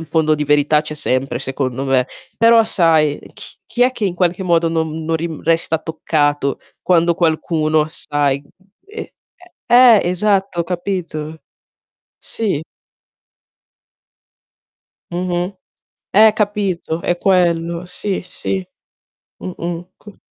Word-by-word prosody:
il 165 Hz, -, -8 dB
fondo 155 Hz, -1 st, +2 dB
di 150 Hz, 0 st, -2 dB
verità 150 Hz, +1 st, +3 dB
c'è 150 Hz, 0 st, -6 dB
sempre, 130 Hz, -3 st, -1 dB
secondo 135 Hz, -1 st, -3 dB
me. 130 Hz, -2 st, +2 dB, 0.3 s
Però 230 Hz, 0 st, +6 dB
sai 160 Hz, -7 st, +2 dB, 0.2 s
ch -, -, -12 dB
chi 245 Hz, -, 0 dB
è 250 Hz, +1 st, +3 dB
che 220 Hz, -5 st, -2 dB
in 180 Hz, -, -2 dB
qualche 180 Hz, +1 st, 0 dB
modo 170 Hz, -2 st, +2 dB
non 160 Hz, -1 st, -2 dB
non 165 Hz, +1 st, -1 dB
ri 165 Hz, +1 st, -1 dB
resta 165 Hz, 0 st, +1 dB
toccato 145 Hz, -3 st, -1 dB, 0.2 s
quando 170 Hz, -1 st, +3 dB
qualcuno, 155 Hz, -2 st, +1 dB
sai 145 Hz, -3 st, -1 dB
mhmm, 145 Hz, -, -25 dB, 0.4 s
ehm, 430 Hz, +2 st, -7 dB, 0.6 s
ehm, 240 Hz, -3 st, +7 dB
eh, -, -, -1 dB
esatto, 190 Hz, -1 st, +1 dB
capito? 170 Hz, -4 st, -4 dB, 0.8 s
Sì. 200 Hz, -10 st, -2 dB, 2.5 s
Mh-mh. 175 Hz, +1 st, -2 dB, 0.6 s
Eh, 215 Hz, +1 st, +6 dB
capito, 200 Hz, -6 st, -1 dB
è 175 Hz, -, 0 dB
quello. 170 Hz, -2 st, +1 dB
Sì, 190 Hz, +2 st, -3 dB
sì. 185 Hz, +1 st, -4 dB, 0.7 s
Mh-mh. 175 Hz, -1 st, -6 dB
Co 210 Hz, -1 st, -15 dB
170 Hz, 120 wpm, -18 LUFS, 155-185 Hz, 2.5 s, ehm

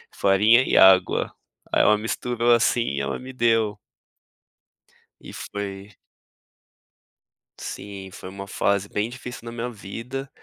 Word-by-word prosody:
farinha 105 Hz, +6 st, +4 dB
e -, -, -1 dB
água, 95 Hz, -1 st, +5 dB, 0.4 s
aí -, -, +3 dB
ela 105 Hz, -, +5 dB
misturou 120 Hz, +2 st, -1 dB
assim 120 Hz, +1 st, +3 dB, 0.2 s
e -, -, 0 dB
ela -, -, -3 dB
me 130 Hz, +1 st, -9 dB
deu. 115 Hz, -4 st, +1 dB, 1.4 s
E -, -, -11 dB
foi 100 Hz, 0 st, -6 dB, 1.7 s
Sim 100 Hz, -2 st, -7 dB
foi 95 Hz, -, -9 dB
uma 100 Hz, +1 st, -8 dB
fase 100 Hz, 0 st, 0 dB
bem 105 Hz, +3 st, -2 dB
difícil 125 Hz, -1 st, -8 dB
na 115 Hz, -, -6 dB
minha 120 Hz, +1 st, -4 dB
vida, 120 Hz, +5 st, -7 dB
105 Hz, 125 wpm, -24 LUFS, 100-120 Hz, 1.7 s, água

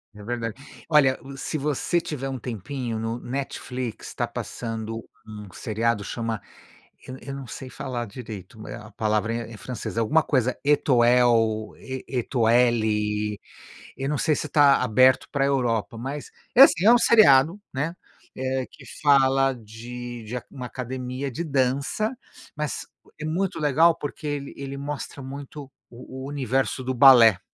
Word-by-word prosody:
É 105 Hz, -, -11 dB
verdade. 115 Hz, 0 st, -3 dB, 0.3 s
Olha, 140 Hz, -4 st, +4 dB
uh, 135 Hz, 0 st, -10 dB
se 155 Hz, -, -3 dB
você 150 Hz, +4 st, 0 dB
tiver 135 Hz, -5 st, -4 dB
um 130 Hz, -1 st, -4 dB
tempinho, 120 Hz, +1 st, -4 dB
no 115 Hz, +2 st, -3 dB
Netflix 125 Hz, -2 st, -5 dB
tá -, -, -1 dB
passando 115 Hz, -1 st, -5 dB, 0.2 s
um 105 Hz, -1 st, -9 dB
seriado 110 Hz, -1 st, -1 dB
chama 115 Hz, -1 st, -3 dB, 0.7 s
eu 130 Hz, -, -7 dB
eu 135 Hz, -, -7 dB
não 135 Hz, -2 st, -7 dB
sei 130 Hz, +3 st, -8 dB
falar 120 Hz, -3 st, -4 dB
direito, 110 Hz, -1 st, -9 dB
eh, -, -, -7 dB
a 105 Hz, +1 st, -10 dB
palavra 110 Hz, +1 st, 0 dB
é 115 Hz, -1 st, -4 dB
é -, -, -9 dB
em 110 Hz, -, -9 dB
francês, 115 Hz, +5 st, -6 dB
alguma 145 Hz, +8 st, +3 dB
coisa 130 Hz, -3 st, +1 dB
Etoel, 120 Hz, -6 st, +3 dB
E 130 Hz, -1 st, -7 dB
E 130 Hz, -, -2 dB
Étoile, 110 Hz, -4 st, +1 dB, 0.6 s
eu 135 Hz, +1 st, -3 dB
não 150 Hz, +1 st, 0 dB
sei 155 Hz, -2 st, +2 dB
se -, -, -3 dB
tá 140 Hz, -3 st, +5 dB
aberto 130 Hz, +2 st, +4 dB
pra 140 Hz, -2 st, +1 dB
Europa, 120 Hz, -5 st, 0 dB
mas 135 Hz, +5 st, -5 dB, 0.2 s
é 250 Hz, -, +7 dB
assim, 190 Hz, -, +7 dB
é 230 Hz, -, +8 dB
um -, -, +7 dB
seriado, 170 Hz, -, +6 dB
né, 150 Hz, +6 st, -2 dB, 0.4 s
eh, 130 Hz, 0 st, -2 dB
que -, -, -16 dB, 0.2 s
fala 135 Hz, -2 st, +4 dB
de 120 Hz, +1 st, -8 dB
de 110 Hz, +3 st, -6 dB
a -, -, -6 dB
uma 125 Hz, -3 st, -6 dB
academia 130 Hz, +2 st, -5 dB
de 170 Hz, +8 st, -4 dB
dança, 140 Hz, -, 0 dB, 0.4 s
mas 150 Hz, -1 st, -3 dB, 0.3 s
é 155 Hz, -, -5 dB
muito 180 Hz, +3 st, -1 dB
legal, 155 Hz, +3 st, +4 dB
porque 145 Hz, +1 st, -6 dB
ele 145 Hz, -1 st, -4 dB
ele 140 Hz, 0 st, -6 dB
mostra 140 Hz, 0 st, -6 dB
muito 140 Hz, +1 st, -8 dB, 0.2 s
o 130 Hz, +2 st, -9 dB
o -, -, -5 dB
universo 135 Hz, -1 st, -1 dB
do 130 Hz, +1 st, -2 dB
balé. 120 Hz, -6 st, +8 dB
130 Hz, 160 wpm, -25 LUFS, 115-140 Hz, 0.7 s, é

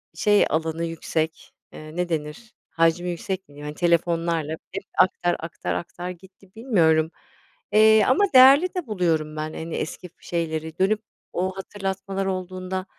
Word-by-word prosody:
şey 205 Hz, -1 st, +4 dB
alanı 160 Hz, +1 st, -1 dB
yüksek, 160 Hz, -1 st, -3 dB, 0.2 s
eee, 155 Hz, +1 st, -10 dB
ne 180 Hz, 0 st, -1 dB
denir 160 Hz, +8 st, -4 dB, 0.2 s
hacmi 165 Hz, +2 st, +1 dB
yüksek 180 Hz, +2 st, -3 dB
mi -, -, -54 dB
diyeyim, 145 Hz, 0 st, -11 dB
hani, 150 Hz, 0 st, -6 dB
telefonlarla 170 Hz, -2 st, +1 dB, 0.2 s
hep 195 Hz, +2 st, -5 dB, 0.2 s
aktar, 180 Hz, -1 st, +3 dB
aktar, 165 Hz, +1 st, -4 dB
aktar 175 Hz, +1 st, -5 dB
gitti 185 Hz, +1 st, -13 dB
bilmiyorum, 165 Hz, -9 st, +2 dB, 0.6 s
eee, 220 Hz, 0 st, +6 dB
ama 260 Hz, +10 st, +4 dB
değerli 275 Hz, +8 st, +7 dB
de 360 Hz, -8 st, -3 dB
buluyorum 165 Hz, -6 st, 0 dB
ben, 155 Hz, 0 st, -4 dB
hani, 160 Hz, 0 st, -5 dB
eski 180 Hz, +3 st, -5 dB
şeyleri 160 Hz, -1 st, -3 dB
dönüp 210 Hz, +3 st, +2 dB, 0.3 s
o 185 Hz, +1 st, -2 dB
hatırlatmalar 195 Hz, 0 st, -4 dB
olduğunda 185 Hz, 0 st, -4 dB
175 Hz, 145 wpm, -24 LUFS, 160-195 Hz, 0.6 s, değerli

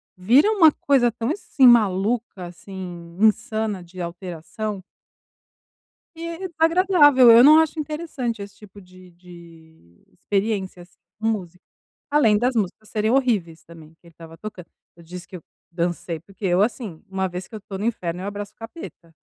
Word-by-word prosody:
Vira 245 Hz, -, +4 dB
uma 345 Hz, -8 st, +6 dB
coisa 265 Hz, -5 st, +2 dB
tão, 230 Hz, +3 st, -3 dB
assim, 300 Hz, -7 st, +1 dB
maluca, 215 Hz, -3 st, +2 dB
assim. 175 Hz, -1 st, -10 dB
Insana 215 Hz, -2 st, 0 dB
de 175 Hz, +2 st, -14 dB
alteração 175 Hz, +4 st, -6 dB, 1.4 s
e 335 Hz, +3 st, -6 dB
desagradável. 325 Hz, -6 st, +5 dB
Eu 230 Hz, +1 st, +8 dB
não 305 Hz, +3 st, +8 dB
acho 320 Hz, 0 st, 0 dB
interessante 290 Hz, -7 st, -4 dB
esse 200 Hz, 0 st, -10 dB
tipo 205 Hz, -1 st, -15 dB
de 185 Hz, 0 st, -17 dB
de 165 Hz, -, -17 dB
experiência, 195 Hz, -, -3 dB
assim, 175 Hz, -, -24 dB, 0.2 s
com 220 Hz, -, -2 dB
música. 185 Hz, -5 st, -4 dB, 0.5 s
Além 235 Hz, -8 st, +3 dB
das 250 Hz, +3 st, 0 dB
músicas 215 Hz, 0 st, -3 dB
serem 215 Hz, +1 st, 0 dB
horríveis 205 Hz, -, 0 dB
também 165 Hz, -2 st, -15 dB
que -, -, -61 dB
ele -, -, -17 dB
estava 165 Hz, 0 st, -13 dB
tocando. 190 Hz, -2 st, -9 dB, 0.3 s
Eu 170 Hz, -, -17 dB
disse 175 Hz, +1 st, -10 dB
que -, -, -11 dB
eu -, -, -15 dB, 0.3 s
dancei, 170 Hz, -1 st, -3 dB
porque 195 Hz, +5 st, -10 dB
eu, 180 Hz, 0 st, +2 dB
assim, 210 Hz, -6 st, -3 dB
uma 190 Hz, 0 st, -2 dB
vez 180 Hz, +1 st, -7 dB
que 225 Hz, -, -11 dB
eu -, -, -6 dB
estou 195 Hz, -1 st, -8 dB
no 205 Hz, -, -4 dB
inferno, 180 Hz, -6 st, -3 dB
eu 195 Hz, -, -5 dB
abraço 205 Hz, 0 st, -6 dB
o -, -, -58 dB
capeta. 225 Hz, -, -11 dB
200 Hz, 165 wpm, -22 LUFS, 175-240 Hz, 1.4 s, Eu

